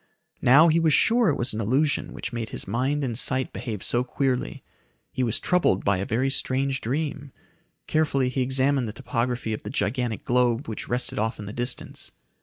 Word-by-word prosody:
Now 145 +7 +7
he 165 0 +3
was 160 -3 +4
sure 230 -3 +4
it 145 - 0
was 120 0 0
an 110 - -3
illusion 135 +8 +1
which 115 - -6
made 115 -2 -4
his - - -4
mind 130 +8 0
and 120 -4 -2
sight 130 +2 0
behave 110 -4 -5
so 120 +1 +1
queerly. 130 0 -2 0.5
He - - -3
was 115 -2 +1
troubled 180 - +1
by 100 -1 +2
a 95 - -3
very 130 +5 0
strange 135 0 0
dream. 140 +2 -3 0.5
Carefully 140 -4 +1
he 130 +1 -2
examined 130 0 +2
the 105 - -6
topography 125 -3 -2
of 110 - -5
the - - -7
gigantic 115 +1 -2
globe 125 +2 +1
which 110 - -6
rested 125 -2 -1
off 110 +1 -1
in 105 - -7
the 100 - -7
distance. 120 +1 -4
125 Hz, 195 wpm, -25 LUFS, 115-140 Hz, 0.5 s, Now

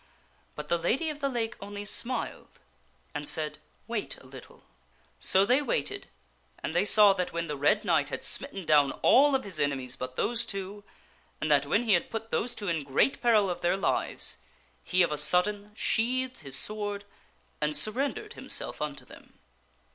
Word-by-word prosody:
But 150 0 -6
the 170 - +1
Lady 270 - 0
of 295 - -9
the 280 -1 0
Lake 235 -3 -2
only 205 +1 -6
smiled 245 +4 -2 0.5
and 145 -1 -1
said, 150 -1 0
" - - -37
Wait 230 -3 -3
a - - -17
little." 130 0 -13 0.6
So 190 - +4
they 250 +6 +3
waited 400 +7 -2 0.6
and - - -3
they - - +2
saw 210 -1 +7
that 180 -2 -2
when 170 0 -2
the 150 -3 -4
Red 150 +10 +2
Knight 160 -6 +2
had - - -5
smitten 235 -10 -2
down 145 -3 +4
all 280 +2 +6
of 265 - 0
his 195 -4 -7
enemies 135 -3 -1
but 130 0 -6
those 235 - +1
two, 195 +1 -6 0.6
and 155 - -1
that 140 -1 +4
when 205 +10 +2
he 220 -4 +3
had 175 - +2
put 225 0 -5
those 240 +1 -1
two 205 - -5
in 165 -4 0
great 140 - +1
peril 225 -4 +4
of 175 -1 -3
their 175 +2 +2
lives, - - -1 0.5
he 185 -1 +3
of 170 - 0
a 150 - +2
sudden 200 +6 +2
sheathed 255 +4 0
his 135 -3 -5
sword 205 +1 -3 0.6
and 150 0 +1
surrendered 280 - -2
himself - - -3
unto 150 -1 -4
them. - - -16
200 Hz, 185 wpm, -29 LUFS, 150-230 Hz, 0.6 s, saw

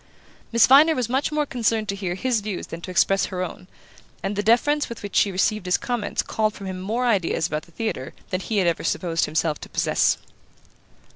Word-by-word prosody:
Miss 230 0 +6
Viner 300 +5 +6
was 245 -3 -1
much 265 +4 0
more 300 0 +1
concerned 225 -4 0
to 200 - -1
hear 185 -3 -3
his 240 +2 0
views 205 -3 -4
than 165 - -8
to 185 - -8
express 195 +2 +3
her 185 -1 -3
own, 180 +1 -7 0.6
and 195 +1 -2
the 205 - 0
deference 245 +8 +2
with 235 - -8
which 205 - -6
she 200 - +4
received 190 +1 0
his 180 - +3
comments 240 -4 -2
called 215 -1 -1
from 200 - -9
him 185 -1 -5
more 225 +6 -1
ideas 195 -8 +1
about 155 -2 -3
the - - -20
theatre 195 - -4 0.2
than 185 - -1
he 215 +3 -2
had 190 - +3
ever 170 -2 0
supposed 165 -3 0
himself 155 0 -1
to - - -9
possess. - - +2
205 Hz, 215 wpm, -23 LUFS, 180-235 Hz, 0.6 s, Miss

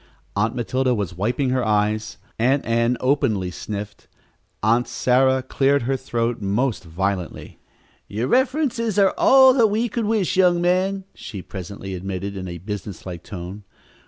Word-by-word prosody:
Aunt 110 +3 0
Matilda 130 +1 0
was 100 -4 -3
wiping 120 - 0
her 130 -1 +1
eyes. 105 0 0 0.2
Aunt 130 +4 +2
Ann 115 +1 +1
openly 130 -9 +1
sniffled. 105 +2 -7 0.6
Aunt 115 +3 +3
Sarah 130 +1 +2
cleared 135 +1 +1
her 135 +3 0
throat 120 -2 -2
most 105 +3 0
violently. 90 +1 -4 0.5
"Your 110 +5 -2
references 250 - +1
are 195 -2 +4
all 265 -1 +7
that 235 -4 +4
we 220 +3 0
could 230 +1 -2
wish, 210 -4 +1
young 180 -2 +4
man," 185 +3 +1
she 95 -4 -8
presently 95 0 -7
admitted 95 +2 -4
in 95 -1 -5
a 85 -1 -6
businesslike 95 -2 -6
tone. 95 +2 -8
120 Hz, 145 wpm, -22 LUFS, 100-145 Hz, 0.6 s, all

